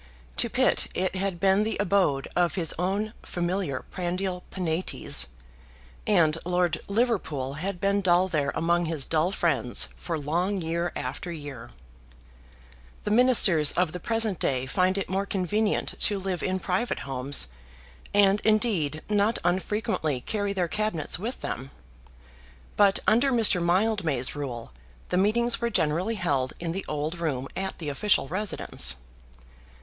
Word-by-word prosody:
To - - +2
Pitt - - +2
it 185 0 -1
had 190 -2 -2
been 195 +1 +3
the 220 +1 -1
abode 185 -9 +1
of 175 -1 +1
his 170 -5 +1
own 200 +4 -1
familiar 175 -6 -3
prandial 180 0 -3
Penates, 165 - 0 0.8
and 165 -6 +3
Lord 180 -1 0
Liverpool 200 - -1
had 180 +5 -4
been 200 +1 +1
dull 180 0 +3
there 150 -5 0
among 170 +1 +1
his 155 -4 0
dull 165 +3 +1
friends 135 - +1
for 165 -2 -4
long 175 +7 -1
year 170 +1 -2
after 135 +8 -5
year. 145 -7 -8 1.3
The 210 - -2
Ministers 215 - +5
of 180 -2 +1
the 180 - -6
present 225 -3 +1
day 130 -1 0
find 185 +8 +1
it 195 - -2
more 195 +2 -1
convenient 205 +3 0
to 205 - +2
live 190 -2 -3
in 185 0 -1
private 190 +7 -2
homes, 135 - 0 0.6
and, 200 0 +4
indeed, 200 -9 +1
not 210 +2 +2
unfrequently 180 - -1
carry 205 - -2
their 185 -3 -1
Cabinets 180 -5 -1
with 230 +7 -5
them. 130 +3 -5 1.1
But, 200 -1 +4
under 240 +6 +3
Mr. 225 -7 +4
Mildmay's 175 - +1
rule, 125 - -6 0.4
the 180 - 0
meetings 235 +5 +2
were 235 - +1
generally 180 +2 0
held 140 -9 -1
in 170 -1 -3
the 195 +3 -4
old 150 +3 -3
room 135 -6 -2
at 190 0 -3
the 155 -4 -5
official 145 +2 +2
residence. 195 +7 +1
180 Hz, 145 wpm, -26 LUFS, 155-200 Hz, 1.3 s, Ministers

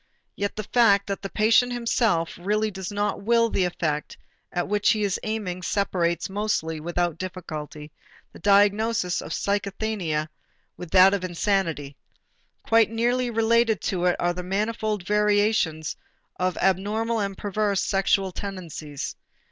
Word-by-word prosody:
Yet 200 0 -3
the 215 - -4
fact 200 -3 +4
that 200 -1 -4
the 195 - -5
patient 225 +5 +3
himself 230 -8 0
really 210 +4 0
does 190 -1 -6
not 205 0 -1
will 230 +2 +3
the 190 - +1
effect 155 -4 -2 0.3
at 175 - -2
which 205 +1 +2
he 215 -2 +2
is 200 -2 0
aiming 205 -5 -3
separates, 180 -4 0
mostly 190 -6 -2
without 175 0 -2
difficulty, 155 -5 -7 0.4
the - - -12
diagnosis 205 0 +3
of - - -8
psychasthenia 200 -5 -1 0.5
from 180 - -7
that 190 +3 +6
of 200 -2 -1
insanity. 170 -6 -1 0.7
Quite 225 -1 +4
nearly 240 +2 0
related 225 -1 +2
to 180 -2 -1
it 180 - +3
are 175 0 0
the 180 - -5
manifold 210 +1 -2
variations 205 -6 +1 0.4
of 185 0 -1
abnormal 210 +5 0
and 195 -2 -3
perverse 205 -1 0
sexual 195 -1 +1
tendencies. 170 -7 -6
200 Hz, 140 wpm, -25 LUFS, 175-215 Hz, 0.7 s, that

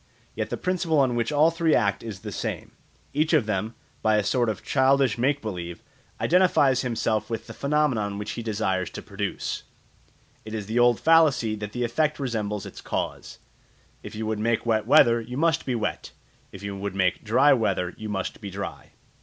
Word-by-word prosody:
Yet - - -3
the - - -3
principle 180 -3 0
on 130 -3 +3
which 120 +4 0
all 150 +3 +4
three 165 -2 +2
act 100 -1 +1
is 110 -5 -7
the - - -6
same; - - -4 0.4
each 155 +3 +1
of 150 -8 +4
them, 105 +2 -2 0.3
by 110 0 +3
a 105 - +2
sort 120 +3 +1
of 105 - -4
childish 135 -3 +3
make 135 +3 0
believe, 85 -5 -6 0.4
identifies 160 -8 +3
himself 110 -3 -1
with 115 -1 -4
the - - -9
phenomenon 140 -9 0
which 105 - -4
he - - -5
desires 100 -5 -1
to - - -8
produce. - - -4 0.8
It 110 0 -6
is 105 -2 -4
the 110 +4 -1
old 120 -1 +4
fallacy 155 -9 +4
that 105 0 -6
the 125 - -2
effect 150 +6 0
resembles 105 -6 -2
its - - -9
cause: - - -4 0.6
if - - -9
you 110 +1 -3
would 110 -1 -2
make 115 +1 0
wet 110 -2 +1
weather, 115 0 +6
you 125 +3 -7
must 165 -1 +1
be 125 - 0
wet; 110 -3 -3 0.4
if 95 - -11
you 100 0 -4
would 100 0 -5
make 90 -2 +1
dry 130 +7 +5
weather, 95 -7 0
you 110 0 -7
must 95 0 -4
be 100 - -6
dry. 100 +1 -7
115 Hz, 195 wpm, -25 LUFS, 105-140 Hz, 0.8 s, weather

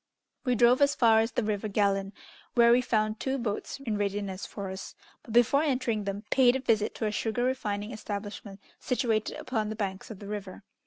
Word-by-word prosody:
We 250 -1 +2
drove 245 +3 +5
as 285 0 +4
far 225 -2 +5
as 225 +1 0
the - - 0
river 210 0 -1
Gallon, 200 -1 +1 0.4
where 235 -1 +6
we 245 +1 +5
found 215 -2 0
two 265 0 -1
boats 230 +1 -3
in 220 -6 -2
readiness 200 -1 -2
for 195 -2 -6
us, 190 +1 -8 0.3
but, - - -12
before 240 +5 +4
entering 250 -8 0
them, 200 +1 -4
paid 255 -2 +5
a - - 0
visit 225 -5 +1
to 225 - -2
a 210 - 0
sugar 225 +3 -1
refining 215 -4 -2
establishment 205 -2 -6 0.2
situated 230 -4 0
upon 220 -4 -2
the 215 - -4
banks 195 -3 -4
of 220 - -7
the 200 - -10
river. 205 -1 -6
215 Hz, 200 wpm, -28 LUFS, 205-245 Hz, 0.4 s, where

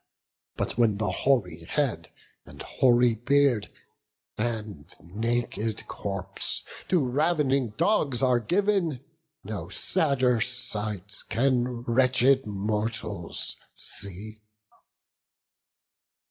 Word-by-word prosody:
But - - -3
when 110 -4 +3
the 105 -3 0
hoary 90 -7 +1
head 115 - -1 0.3
and - - -14
hoary 120 -2 +4
beard, 125 0 +2 0.7
And 110 -8 -4
naked 110 +2 -2
corpse 100 -1 -3 0.2
to 180 - +3
rav'ning 135 -4 +1
dogs 140 - +2
are 125 -2 +4
giv'n, 175 - +1 0.4
No 105 0 -5
sadder 130 -9 +1
sight 105 -5 -2
can 125 -1 +1
wretched 130 +1 +3
mortals 105 +2 -2 0.2
see." 105 +3 -6
120 Hz, 85 wpm, -27 LUFS, 105-135 Hz, 0.7 s, hoary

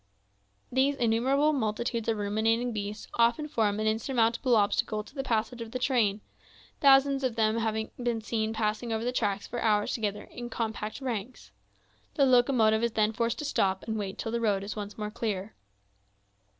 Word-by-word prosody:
These 265 +3 +2
innumerable 265 +5 +2
multitudes 230 -2 -1
of 225 - +1
ruminating 225 +4 0
beasts 210 0 -5
often 235 +6 +3
form 215 -7 0
an 215 - -1
insurmountable 230 +2 +1
obstacle 210 0 +1
to 220 - -17
the 275 - -3
passage 235 -1 -1
of 230 - -6
the - - 0
trains; 225 -6 +1 0.6
thousands 275 0 +5
of 250 -3 0
them 220 0 +2
have 220 -1 0 0.3
been 240 -2 0
seen 220 0 -2
passing 220 +1 -2
over 220 0 -1
the 245 - 0
track 205 -5 -1
for 240 - -5
hours 210 -2 +2
together, 210 -3 -2
in 240 0 -8
compact 220 0 -4
ranks. 245 -2 -5 0.6
The 280 - +4
locomotive 245 -4 +4
is 235 -1 0
then 215 0 +2
forced 230 +1 -1
to 300 - -4
stop 190 -9 0
and 220 - -3
wait 200 -3 -4
till 225 - -4
the 235 0 -1
road 205 -3 +1
is 200 - -5
once 205 -1 -6
more 210 -1 -4
clear. 215 -3 -3
225 Hz, 175 wpm, -28 LUFS, 215-245 Hz, 0.6 s, thousands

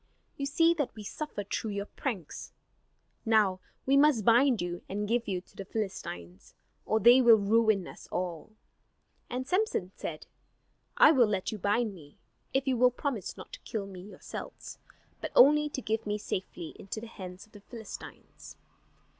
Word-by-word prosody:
You 280 - -3
see 330 +4 +4
that 290 -8 -3
we 215 - -8
suffer 205 0 -5
through 210 +2 -3
your 200 0 -3
pranks. 205 - -5 0.7
Now 215 -5 +3 0.3
we 270 - +3
must 280 -7 +4
bind 240 +1 +5
you 175 0 -3
and 205 +2 -2
give 235 +1 0
you 185 -3 -2
to - - -26
the 195 - -6
Philistines, 135 - -6 0.3
or 220 - +2
they 240 +4 +7
will 235 -2 +8
ruin 215 -1 +2
us - - -12
all." 175 -1 -4 0.8
And 255 +1 -3
Samson 360 - 0
said, 155 -2 -6 0.7
"I 305 - +8
will 255 -7 +5
let 195 -3 -1
you 215 - -6
bind 205 +3 +1
me, 150 -6 -15 0.3
if 270 +1 0
you 260 -2 +2
will 250 +1 +6
promise 250 - -4
not - - -11
to - - -7
kill 210 -3 -4
me 190 -2 -9
yourselves; 200 +3 -9 0.4
but - - -4
only 300 +2 +6
to 265 - -5
give 220 0 -2
me 210 0 0
safely 185 -5 -5
into 200 +3 -6
the 225 - -8
hands 185 -4 -9
of 215 - -29
the 205 - -14
Philistines." 220 0 -10
220 Hz, 170 wpm, -30 LUFS, 195-250 Hz, 0.8 s, will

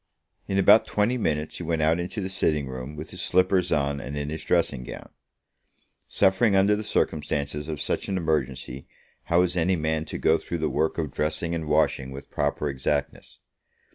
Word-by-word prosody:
In 95 - -1
about 100 +3 +6
twenty 105 +4 +1
minutes 75 -9 -1
he - - -6
went 80 -1 0
out 80 +2 +3
into 90 +4 -4
the 95 - -3
sitting 75 -6 0
room, 65 +2 -7
with 75 +1 -8
his - - -5
slippers 90 0 +2
on 70 -1 +1
and 70 +2 -6
in 75 0 -3
his 80 +1 -5
dressing 80 -7 +1
gown. - - -9 1.0
Suffering 100 +2 +3
under 100 +2 +4
the 105 - -4
circumstances 75 -6 -1
of 75 -2 -4
such - - -2
an 95 - 0
emergency, 70 -5 -2 0.4
how 85 +1 +3
is 90 0 -1
any 90 +2 +2
man 80 -1 -1
to - - -6
go 80 0 +3
through 85 - -4
the 80 -1 -1
work 80 - 0
of 80 -4 -2
dressing 80 +2 -1
and 80 -2 -3
washing 65 -2 +2
with 65 +1 -10
proper 75 - -1
exactness? 70 +1 -3
80 Hz, 190 wpm, -26 LUFS, 75-90 Hz, 1.0 s, about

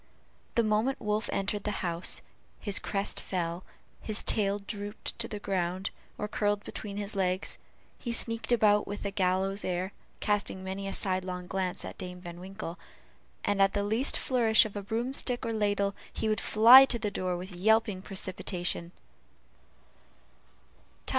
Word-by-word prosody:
The 235 - +4
moment 215 +5 +1
Wolf 210 +1 -1
entered 195 +1 -1
the 210 -3 -2
house, 170 0 0 0.4
his 205 -2 +2
crest 200 -1 -2
fell, 175 -1 -3 0.4
his 215 -1 -2
tail 200 -2 +1
drooped 205 +2 -6
to 230 - 0
the 210 - -5
ground, 185 -1 -2 0.3
or 210 - -2
curled 205 -1 0
between 205 -2 -6
his 205 0 -3
legs, 185 -1 0 0.4
he 235 - -3
sneaked 230 0 +1
about 210 -3 +4
with 205 0 -5
a 200 - -1
gallows 195 +1 +1
air, 185 +2 -2 0.3
casting 205 -2 -1
many 190 +1 -4
a - - -2
sidelong 185 -2 -1
glance 185 -1 -2
at - - -8
Dame 180 -1 -6
Van 175 -1 -9
Winkle, 190 -1 -7 0.7
and 205 -1 +2
at 195 0 +4
the 205 - 0
least 220 +7 +1
flourish 230 -4 +4
of 210 - -7
a 205 - -3
broomstick 240 +4 +1
or 230 - -1
ladle, 205 -2 +1 0.2
he 220 - -2
would 215 0 +1
fly 235 +5 +9
to 250 - -1
the 215 -3 -2
door 180 -2 -1
with 185 +2 -7
yelping 210 +1 +2
precipitation. 180 -2 -1
200 Hz, 155 wpm, -30 LUFS, 185-215 Hz, 0.7 s, fly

